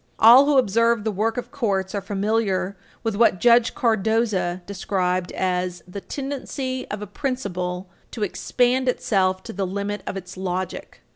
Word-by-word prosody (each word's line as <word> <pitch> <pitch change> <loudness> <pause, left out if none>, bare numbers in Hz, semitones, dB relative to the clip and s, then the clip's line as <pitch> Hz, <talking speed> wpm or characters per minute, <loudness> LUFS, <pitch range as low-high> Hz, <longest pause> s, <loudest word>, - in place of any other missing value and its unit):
All 245 +5 +8
who 290 -2 +4
observe 230 -1 +3
the 220 - 0
work 220 +4 -1
of 245 - -5
courts 200 -9 -1
are 200 - -2
familiar 200 -1 -1 0.3
with 225 -3 -1
what 205 -4 +3
Judge 235 +1 +4
Cardozo 220 -6 +1
described 185 -2 -1
as 180 -2 -1
"the 195 +2 -7
tendency 270 -1 -4
of 210 0 -4
a - - -4
principle 190 -7 -3 0.2
to 220 - -4
expand 250 +5 +1
itself 190 -6 +1
to - - -8
the 195 0 -2
limit 200 +2 -3
of - - -3
its 180 -1 -8
logic." 185 0 -4
205 Hz, 155 wpm, -23 LUFS, 185-235 Hz, 0.3 s, All